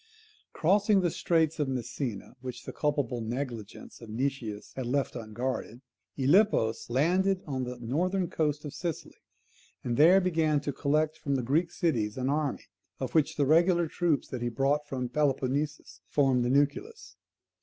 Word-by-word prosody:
Crossing 200 Hz, +4 st, +3 dB
the 175 Hz, -2 st, +1 dB
straits 160 Hz, -2 st, +1 dB
of 145 Hz, -, +1 dB
Messina, 125 Hz, -4 st, -4 dB
which 125 Hz, -1 st, -7 dB
the -, -, -6 dB
culpable 145 Hz, -5 st, -1 dB
negligence 120 Hz, -3 st, -6 dB
of 115 Hz, -, -10 dB
Nicias 115 Hz, -3 st, -3 dB
had 130 Hz, -2 st, -4 dB
left 135 Hz, +2 st, -1 dB
unguarded, 120 Hz, +1 st, -4 dB, 0.4 s
Gylippus 130 Hz, -, +3 dB
landed 185 Hz, +9 st, +2 dB
on 130 Hz, -3 st, -3 dB
the 125 Hz, 0 st, -6 dB
northern 175 Hz, +10 st, 0 dB
coast 150 Hz, -2 st, -1 dB
of 145 Hz, -, -6 dB
Sicily, 170 Hz, -3 st, -5 dB, 0.7 s
and 120 Hz, -1 st, -2 dB
there 175 Hz, +6 st, +7 dB
began 160 Hz, -5 st, +1 dB
to 145 Hz, -1 st, -3 dB
collect 155 Hz, +3 st, 0 dB
from 140 Hz, -1 st, -1 dB
the 130 Hz, -, -1 dB
Greek 155 Hz, +8 st, +1 dB
cities 120 Hz, -, -1 dB
an 130 Hz, +1 st, -1 dB
army, 150 Hz, -1 st, -1 dB, 0.3 s
of 130 Hz, -2 st, -4 dB
which 155 Hz, -3 st, +2 dB
the 145 Hz, -, +2 dB
regular 170 Hz, +3 st, +4 dB
troops 160 Hz, -3 st, 0 dB
that 125 Hz, -, -5 dB
he 120 Hz, -, 0 dB
brought 140 Hz, +5 st, 0 dB
from 130 Hz, -3 st, -3 dB
Peloponnesus 145 Hz, +2 st, -1 dB
formed 135 Hz, -4 st, +2 dB
the 120 Hz, -, 0 dB
nucleus. 145 Hz, -, 0 dB
140 Hz, 155 wpm, -29 LUFS, 125-160 Hz, 0.7 s, there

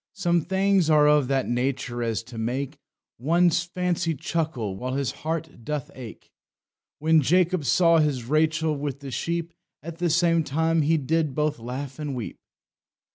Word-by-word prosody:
Some 175 Hz, -3 st, +1 dB
things 190 Hz, -2 st, +2 dB
are 150 Hz, -1 st, +5 dB
of 150 Hz, -3 st, +4 dB
that 135 Hz, -1 st, 0 dB
nature 125 Hz, 0 st, -2 dB
as 115 Hz, -2 st, -1 dB
to 115 Hz, -1 st, -9 dB
make 135 Hz, +5 st, -3 dB, 0.4 s
One's 170 Hz, +5 st, +3 dB
fancy 175 Hz, -1 st, -1 dB
chuckle 140 Hz, -, -2 dB
while 130 Hz, +6 st, -4 dB
his 135 Hz, -4 st, -1 dB
heart 160 Hz, -5 st, -5 dB
doth 150 Hz, +1 st, -4 dB
ake. 125 Hz, -4 st, -11 dB, 0.7 s
When 160 Hz, +1 st, +3 dB
Jacob 175 Hz, +2 st, +2 dB
saw 170 Hz, +2 st, +4 dB
his 145 Hz, -5 st, +1 dB
Rachel 155 Hz, +3 st, +1 dB
with 145 Hz, -1 st, -4 dB
the 140 Hz, -1 st, -7 dB
sheep, 170 Hz, +5 st, -3 dB, 0.3 s
At 165 Hz, +1 st, -8 dB
the 175 Hz, -1 st, +1 dB
same 165 Hz, 0 st, +3 dB
time 160 Hz, +3 st, +1 dB
he 160 Hz, +2 st, +2 dB
did 155 Hz, 0 st, 0 dB
both 150 Hz, -3 st, 0 dB
laugh 130 Hz, +4 st, -6 dB
and 145 Hz, -3 st, -3 dB
weep." 120 Hz, -4 st, -6 dB
150 Hz, 160 wpm, -25 LUFS, 130-165 Hz, 0.7 s, are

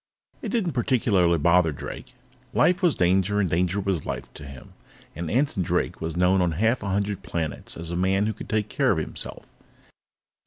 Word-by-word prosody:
It -, -, -4 dB
didn't 215 Hz, -8 st, 0 dB
particularly 110 Hz, -, +2 dB
bother 85 Hz, +1 st, +4 dB
Drake; 70 Hz, -, -8 dB, 0.4 s
life 180 Hz, +1 st, +3 dB
was 175 Hz, -5 st, +3 dB
danger 95 Hz, +3 st, +2 dB
and 100 Hz, -, +2 dB
danger 90 Hz, +4 st, 0 dB
was 95 Hz, -5 st, -1 dB
life -, -, -6 dB
to 75 Hz, -, -10 dB
him, 70 Hz, -2 st, -12 dB, 0.4 s
and 85 Hz, -1 st, -4 dB
Anson 130 Hz, -5 st, +1 dB
Drake 85 Hz, -, -1 dB
was 80 Hz, +1 st, -3 dB
known 90 Hz, +1 st, +3 dB
on 85 Hz, -2 st, +1 dB
half 115 Hz, +8 st, +1 dB
a 100 Hz, -, -3 dB
hundred 100 Hz, 0 st, -1 dB
planets 80 Hz, -4 st, -4 dB
as 85 Hz, 0 st, -6 dB
a -, -, -2 dB
man 95 Hz, +3 st, +2 dB
who 110 Hz, -, -1 dB
could 105 Hz, -, -10 dB
take 110 Hz, -2 st, 0 dB
care -, -, +1 dB
of -, -, +1 dB
himself. -, -, -6 dB
95 Hz, 190 wpm, -25 LUFS, 85-105 Hz, 0.4 s, bother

